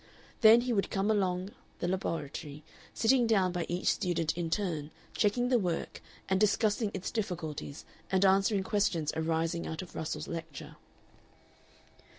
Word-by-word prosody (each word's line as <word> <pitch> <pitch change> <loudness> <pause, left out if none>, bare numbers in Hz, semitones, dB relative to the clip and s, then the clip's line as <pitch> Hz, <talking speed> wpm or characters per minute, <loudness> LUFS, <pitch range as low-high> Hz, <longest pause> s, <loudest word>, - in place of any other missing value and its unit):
Then 225 +1 +8
he 245 0 -1
would 200 -3 0
come 200 +2 +1
along 190 -2 0 0.3
the 175 - -2
laboratory, 155 -5 -4 0.3
sitting 240 +1 +3
down 195 -5 +3
by 175 -1 -3
each 175 +1 -3
student 170 -4 +1
in 170 -1 -2
turn, 160 -5 -2 0.2
checking 245 +4 +1
the 250 -2 +4
work 175 -5 -3 0.3
and 190 0 +1
discussing 210 +1 +2
its 190 - -4
difficulties, 165 -8 -4 0.3
and 190 0 +3
answering 195 +1 +3
questions 190 -7 0
arising 165 +1 -1
out 160 +3 -4
of 180 - -13
Russell's 160 0 -4
lecture. 165 -3 -7
185 Hz, 145 wpm, -31 LUFS, 165-210 Hz, 0.3 s, Then